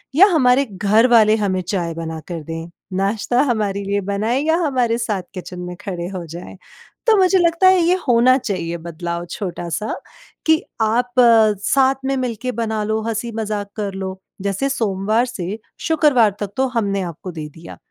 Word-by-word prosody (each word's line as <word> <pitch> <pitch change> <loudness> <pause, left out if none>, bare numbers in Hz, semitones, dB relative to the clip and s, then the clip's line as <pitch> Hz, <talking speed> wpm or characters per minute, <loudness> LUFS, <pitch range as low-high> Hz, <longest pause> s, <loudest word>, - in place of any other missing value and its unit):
या 380 +6 +8
हमारे 265 -2 +4
घर 210 +5 +3
वाले 215 -1 +6
हमें 195 -4 0
चाय 175 -2 -2
बना 160 -1 -5
कर 170 -2 -5
दें। 165 +2 -6 0.3
नाश्ता 205 +5 +1
हमारे 210 -6 -1
लिए 200 +1 -1
बनाएँ 225 +7 0
या 320 +1 +3
हमारे 250 -5 +1
साथ 215 -5 -2
किचन 180 -1 -7
में 180 0 -6
खड़े 175 -3 -4
हो 185 -3 -6
जाएँ। 170 +4 -9 0.5
तो 450 - +6
मुझे 380 0 +4
लगता 340 +1 +3
है 375 0 +6
ये 345 +2 +3
होना 250 +2 +5
चाहिए 175 -8 -3
बदलाव 170 +1 -5
छोटा-सा 185 +1 -4 0.5
कि 320 0 +4 0.2
आप 240 +3 +1 0.5
साथ 270 +3 +3
में 270 0 0
मिल 250 -3 -2
के 255 0 -2
बना 220 -2 -2
लो 220 +1 -1
हँसी-मजाक 220 -2 -3
कर 205 -3 -3
लो 190 0 -5 0.2
जैसे 200 +7 -1
सोमवार 220 -2 0
से 205 -4 -5 0.2
शुक्रवार 290 -9 +3
तक 205 - -3
तो 265 - +3
हमने 200 -4 0
आपको 175 +1 -6
दे 155 -2 -6
दिया, 165 +3 -12
210 Hz, 170 wpm, -20 LUFS, 185-250 Hz, 0.5 s, या